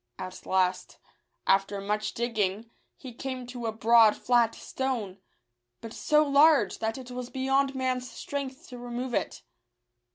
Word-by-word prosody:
At 185 0 -8
last, 185 -1 0 0.5
after 195 +1 +2
much 210 +2 -2
digging, 225 -2 -1 0.3
he 255 -3 -10
came 255 +1 -5
to 245 -1 -6
a - - 0
broad, 225 0 +5
flat 240 -2 +2
stone, 230 -8 -4 0.6
but 225 0 -9
so 300 0 +2
large, 290 +2 +4
that 225 +1 -2
it 255 -1 -9
was 250 0 -6
beyond 270 +1 +1
man's 255 -1 -1
strength 280 +3 -6
to 250 -2 -9
remove 245 +1 -5
it. - - -2
245 Hz, 140 wpm, -28 LUFS, 220-265 Hz, 0.6 s, broad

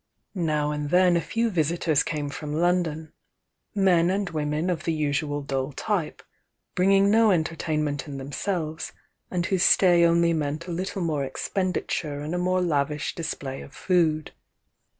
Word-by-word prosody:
Now 155 -5 0
and 150 -1 -3
then 180 +1 +4
a 170 - +2
few 230 +8 -1
visitors 160 -3 +1
came 150 -3 -3
from 150 +1 -5
London, 165 -2 0 0.3
— - - -54 0.3
men 180 -4 +4
and 195 +1 0
women 155 +2 -1
of 170 -2 -3
the 165 - +1
usual 145 -1 -1
dull 135 0 -2
type, 185 -4 -2 0.5
bringing 195 +2 +4
no 225 0 +5
entertainment 155 -4 -1
in 140 -1 -6
themselves, 155 +3 -3 0.4
and 175 -1 -1
whose 190 -1 0
stay 175 -2 +5
only 170 0 +4
meant 155 +1 -2
a 180 - -6
little 185 +2 -3
more 155 -4 0
expenditure 155 0 -2
and 150 +3 -4
a 180 - -1
more 185 +1 +1
lavish 150 -3 -1
display 135 -5 -5
of 140 - -12
food. 160 -4 +1
165 Hz, 155 wpm, -25 LUFS, 150-180 Hz, 0.5 s, no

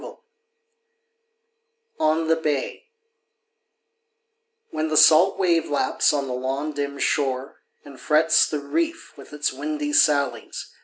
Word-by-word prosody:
19 - - -11 1.8
ON 160 +1 +1
THE 165 - +3
BAY 155 - -3 1.9
When 155 +1 -2
the 155 -1 -1
salt 170 +7 +5
wave 170 -3 +1
laps 145 - +1
on 145 -2 -2
the 130 - -5
long, 135 +4 -4
dim 140 0 -4
shore, 135 -1 -2 0.3
And 140 -2 -13
frets 155 0 +3
the 150 - -2
reef 330 - -3
with 140 - -15
its 150 -1 -2
windy 150 +1 -4
sallies, 145 -2 0
xA. - - -30
150 Hz, 125 wpm, -22 LUFS, 140-160 Hz, 1.9 s, salt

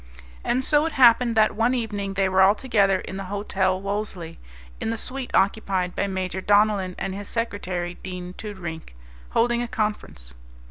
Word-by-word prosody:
And 255 +2 0
so 300 +1 +3
it 325 - -5
happened 240 -2 +5
that 215 0 +4
one 235 +4 +2
evening 205 -5 -3
they 195 -1 +2
were 190 0 +3
all 195 +2 +6
together 200 -6 +2
in 190 - -7
the 195 - -5
Hotel 190 -1 -1
Wolesley, 195 -4 -4 0.4
in - - -2
the 230 - -2
suite 260 +2 -5
occupied 190 -3 +1
by 200 - 0
Major 190 -1 -3
Donellan 205 -2 +2
and 190 - -3
his 200 +1 -6
secretary, 185 -6 -3
Dean 180 -1 -6
Toodrink, 175 - -7 0.3
holding 240 +1 +2
a 240 - -2
conference. 210 - -4
200 Hz, 170 wpm, -24 LUFS, 185-225 Hz, 0.4 s, all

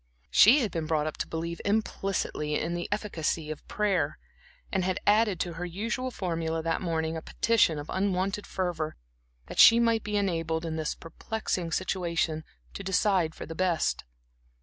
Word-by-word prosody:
She 255 +8 +7
had 220 -6 -1
been 165 -2 -3
brought 155 -2 +1
up 155 - -4
to - - -3
believe 170 +1 -4
implicitly 195 -7 -1
in 170 +2 -2
the 175 0 -3
efficacy 165 -6 -2
of 155 - -8
prayer, 185 -8 0 0.5
and 190 - +1
had 185 +1 0
added 210 -3 +3
to 175 - -2
her 165 +2 -5
usual 230 +8 -3
formula 165 -6 -2
that 165 0 -1
morning 160 -2 -1
a 160 - -4
petition 210 -8 +2
of 145 +1 -6
unwonted 195 +1 -1
fervor 175 -4 -2 0.5
that - - -7
she 230 +1 +9
might 230 -2 +2
be 210 0 -1
enabled 165 -4 -1
in 160 -1 -3
this 155 -1 -2
perplexing 175 0 -4
situation 170 -3 -1 0.3
to 200 - -6
decide 190 -4 +2
for - - -7
the 165 - -7
best. 175 -1 0
175 Hz, 170 wpm, -28 LUFS, 160-200 Hz, 0.5 s, she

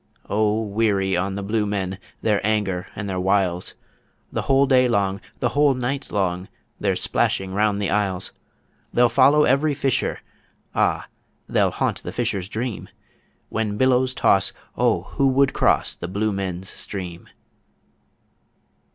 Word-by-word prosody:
O 110 +1 +1
weary 100 -3 +1
on 95 +2 -1
the 100 - -4
Blue 105 +1 0
Men, 95 -2 -2 0.2
their 105 -2 +1
anger 100 -4 0
and 105 - -4
their 95 -1 -2
wiles! 95 -2 0 0.6
The - - -1
whole 135 +1 +3
day 130 -2 +4
long, 100 -4 0 0.2
the - - +2
whole 145 -1 +3
night 130 +2 -3
long, 95 -2 -1 0.3
they're - - +1
splashing 95 -1 0
round 105 0 +1
the 100 -4 -1
isles; 95 -2 0 0.6
They'll 120 0 +4
follow 140 +5 +5
every 145 +2 +2
fisher 135 -1 0 0.5
ah! - - +1 0.4
they'll - - +2
haunt - - -2
the - - -6
fisher's 95 -1 -1
dream 115 0 -4 0.6
When 105 -2 -2
billows 130 0 +2
toss, 95 -1 +3 0.2
O - - +2
who 135 - 0
would 135 +1 +3
cross - - +2
the 85 - -6
Blue 105 +4 -1
Men's 95 -1 -4
Stream? 90 -4 -6
105 Hz, 145 wpm, -23 LUFS, 95-125 Hz, 0.6 s, follow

